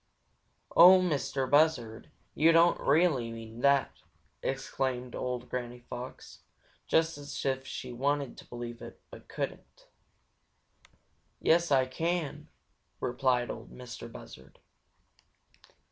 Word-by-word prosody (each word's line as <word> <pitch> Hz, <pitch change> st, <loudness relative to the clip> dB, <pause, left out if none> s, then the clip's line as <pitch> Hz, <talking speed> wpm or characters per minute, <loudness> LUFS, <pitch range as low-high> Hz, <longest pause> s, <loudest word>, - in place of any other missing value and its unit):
"Oh, 185 Hz, +2 st, +9 dB
Mistah 140 Hz, -6 st, -1 dB
Buzzard, 130 Hz, -6 st, +2 dB, 0.2 s
you 160 Hz, +2 st, +5 dB
don't 165 Hz, +1 st, +5 dB
really 145 Hz, -8 st, +2 dB
mean 115 Hz, 0 st, -9 dB
that!" 140 Hz, 0 st, +2 dB, 0.4 s
exclaimed 130 Hz, -2 st, -3 dB
old 125 Hz, -1 st, -4 dB
Granny 125 Hz, -1 st, -5 dB
Fox, 125 Hz, 0 st, -8 dB, 0.5 s
just 160 Hz, -2 st, +2 dB
as 140 Hz, -1 st, -6 dB
if 135 Hz, 0 st, -1 dB
she 125 Hz, -2 st, -6 dB
wanted 140 Hz, +1 st, -1 dB
to -, -, -13 dB
believe 120 Hz, -1 st, -7 dB
it, -, -, -10 dB
but -, -, -12 dB
couldn't. -, -, -6 dB, 1.5 s
"Yes, 170 Hz, +1 st, +3 dB
Ah 130 Hz, -2 st, +4 dB
can!" 165 Hz, +3 st, -3 dB, 0.5 s
replied 125 Hz, 0 st, 0 dB
Ol' -, -, -8 dB
Mistah 125 Hz, -2 st, -9 dB
Buzzard. 65 Hz, -, -13 dB
130 Hz, 110 wpm, -30 LUFS, 125-155 Hz, 1.5 s, Oh